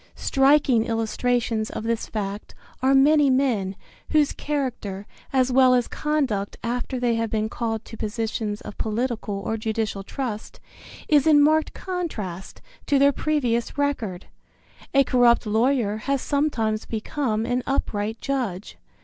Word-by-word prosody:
Striking 270 -3 +3
illustrations 225 0 0
of - - -5
this 230 0 -1
fact 205 -1 -5 0.3
are 265 +1 +4
many 290 +1 +5
men, 240 -8 +1 0.3
whose 300 -2 +3
character, 245 -9 -3 0.3
as 260 -1 +2
well 255 0 +5
as 245 -1 +1
conduct 270 -10 -1
after 245 +2 -2
they 245 -1 +1
have 230 0 -1
been 215 0 0
called 225 -2 -3
to - - -10
positions 215 -1 -3
of - - -10
political 225 -1 -2
or 220 +2 -2
judicial 220 -2 -2
trust, 220 0 -5 0.5
is 295 -2 +4
in 300 -2 +7
marked 310 +2 +3
contrast 225 - -5 0.2
to 285 - +3
their 280 +1 +5
previous 260 -5 -1
record. 235 -11 -2 0.7
A 275 0 +5
corrupt 245 -2 +4
lawyer 220 0 +1
has 275 +5 -1
sometimes 245 -7 -1
become 225 0 -2
an 245 +1 0
upright 220 -5 -1
judge. 235 -8 -3
240 Hz, 135 wpm, -24 LUFS, 215-275 Hz, 0.7 s, in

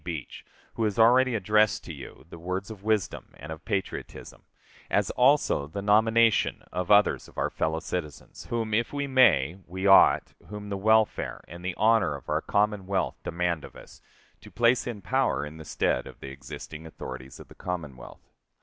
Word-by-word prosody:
Beach] 80 -6 -6 0.3
who 115 - -2
has 105 -2 -1
already 125 +2 +5
addressed 105 +1 +2
to - - -8
you - - -11
the 85 - -10
words 95 +5 -4
of 105 -3 -10
wisdom 110 -3 -2
and 75 +3 -9
of 80 0 -8
patriotism; 100 -3 -5 0.5
as - - +1
also 125 - +3
the 100 +6 -6
nomination 110 +2 +3
of 90 -1 -3
others 105 0 +4
of - - -19
our - - -1
fellow 80 0 -1
citizens, 80 -4 -6
whom 115 -2 -2
if 115 +2 +1
we 145 0 -2
may 100 - +3
we 95 +3 -5
ought, 95 -1 +6
whom 105 0 -8
the 100 - -2
welfare 110 +2 +1
and 85 +2 -11
the 90 -1 -3
honor 110 -7 +3
of 70 - -11
our - - +1
Commonwealth 100 -2 -1
demand 85 -2 -2
of - - -12
us, - - -14 0.4
to - - -14
place 120 +1 +2
in 110 -5 -6
power 130 - 0
in 75 +2 -10
the 80 - -10
stead 65 - -1
of - - -13
the 65 - -8
existing 70 +4 -9
authorities 65 -4 -9
of - - -12
the - - -15
Commonwealth. 75 -9 -7
100 Hz, 180 wpm, -27 LUFS, 80-110 Hz, 0.5 s, ought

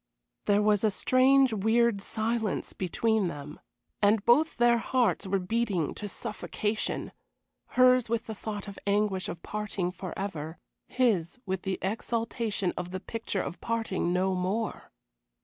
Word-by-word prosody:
There 205 0 +3
was 210 -1 +3
a 215 - +5
strange, 260 +4 +4
weird 220 0 +2
silence 220 0 -2
between 215 +2 +1
them, 150 -2 -7 0.4
and 205 0 +3
both 295 +7 +4
their 240 -1 +4
hearts 225 -6 +1
were 195 +1 +1
beating 190 -4 0
to 210 - -5
suffocation 210 0 -2 0.7
hers 255 -2 +5
with 230 0 0
the 220 - -5
thought 210 -1 -6
of 200 - -6
the - - -2
anguish 200 -2 +1
of 170 - -7
parting 205 -4 -3
forever, 180 -4 -5 0.3
his 225 -8 +1
with 190 -1 -2
the 190 0 -2
exaltation 225 -1 -1
of 180 - -4
the 185 +1 -4
picture 210 -1 -3
of 170 - -7
parting 225 -6 -1
no 185 +1 +1
more. 190 +5 -2
210 Hz, 145 wpm, -29 LUFS, 190-230 Hz, 0.7 s, a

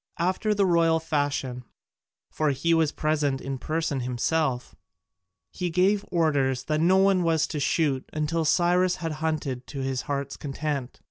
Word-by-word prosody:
After 190 +5 0
the 200 -1 +3
royal 165 -2 +3
fashion 145 -5 -2 0.7
for 155 -1 0
he 145 +5 +1
was 160 -2 +3
present 150 -3 0
in 135 -1 -5
person 155 -2 -2
himself 125 +2 -1 0.8
he 180 -1 -3
gave 190 +4 +2
orders 140 -7 +1
that 155 0 -1
no 185 +3 +4
one 195 -1 +4
was 165 -2 +2
to 150 - -4
shoot 140 -2 0
until 155 +2 -1
Cyrus 175 +3 +3
had 165 -1 -4
hunted 145 -6 -2
to 140 -2 -6
his 130 -1 -2
heart's 140 -1 -3
content. 140 -2 -4
155 Hz, 150 wpm, -26 LUFS, 135-170 Hz, 0.8 s, no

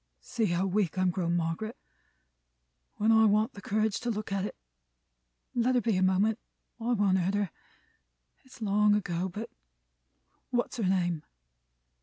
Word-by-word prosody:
"See 230 -3 -2
how 175 0 +1
weak 190 -3 0
I'm 185 -1 +3
grown, 170 -1 -1
Margaret, 175 +7 -2 1.2
when 215 +2 +2
I 220 0 +6
want 215 +3 +3
the 200 - -10
courage 215 +1 0
to 245 - -3
look 215 -2 -3
at 195 -1 0
it! - - -5 1.0
Let 245 +1 +2
her 245 - +3
be, 225 -3 +1
a 185 - +1
moment. 195 +4 +2 0.4
I 235 +2 0
won't 195 -4 +3
hurt 185 +3 0
her. 205 -4 0 0.9
It's 255 -3 -11
long 210 0 +4
ago, 180 -2 -1
but 210 +6 -6 1.0
What's 245 0 -1
her 220 - 0
name?" 175 -4 +1
205 Hz, 155 wpm, -29 LUFS, 185-220 Hz, 1.2 s, I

